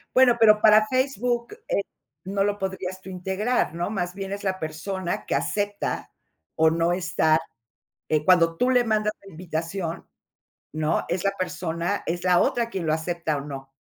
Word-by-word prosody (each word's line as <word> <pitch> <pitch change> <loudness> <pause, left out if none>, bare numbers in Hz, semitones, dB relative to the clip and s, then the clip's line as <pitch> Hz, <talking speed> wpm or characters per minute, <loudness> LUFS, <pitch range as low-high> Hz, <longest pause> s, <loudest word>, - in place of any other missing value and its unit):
Bueno, 250 -2 +6
pero, 215 -2 +7
para 215 0 +6
Facebook, 250 -2 0
eh, - - +1 0.4
no 195 +1 0
lo 205 0 0
podrías 190 -1 -4
tú 190 - -10
integrar, 190 +3 -1
¿no? 175 +2 -2
Más 180 -4 -2
bien 195 -1 -5
es 200 - -6
la 190 -1 -1
persona 170 +3 -4
que - - -1
acepta 205 0 -2 0.4
o 160 0 +5
no 165 +1 +1
estar, 175 -3 +2 0.7
eh, 155 -1 +1
cuando 165 -3 +4
tú 250 - +2
le 250 -1 +4
mandas 215 -2 +1
la 195 - -13
invitación, 165 +1 -4 0.7
¿no? 155 +1 0
Es 175 +2 -2
la 195 - +2
persona 175 +1 -2
es 175 +2 -2
la 180 -1 +4
otra 235 -1 +1
quien 190 -7 -4
lo 155 - +2
acepta 160 -1 -1
o - - -4
no. 135 -1 -8
185 Hz, 175 wpm, -25 LUFS, 165-210 Hz, 0.7 s, pero